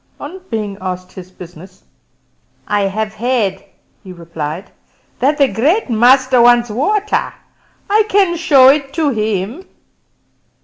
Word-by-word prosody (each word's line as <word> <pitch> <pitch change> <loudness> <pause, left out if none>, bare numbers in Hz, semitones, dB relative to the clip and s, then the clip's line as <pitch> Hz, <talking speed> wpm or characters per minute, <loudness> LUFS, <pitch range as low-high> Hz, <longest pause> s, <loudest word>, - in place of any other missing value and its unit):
On 355 +6 -9
being 210 -3 -4
asked 185 -1 -6
his 185 -1 -11
business, 180 0 -14 0.8
"I 205 -1 0
have 215 +2 -3
heard," 215 -4 -1 0.4
he 185 - -11
replied, 170 0 -7 0.5
"that 285 +4 +1
the 280 -2 +4
Great 290 - 0
Master 255 +2 +4
wants 240 -1 +4
water; 410 - -1 0.6
I 425 +1 +2
can 385 -4 +2
show 280 -6 +5
it 275 -1 +1
to 315 -4 +1
him." 215 - -3
235 Hz, 125 wpm, -15 LUFS, 195-285 Hz, 0.8 s, show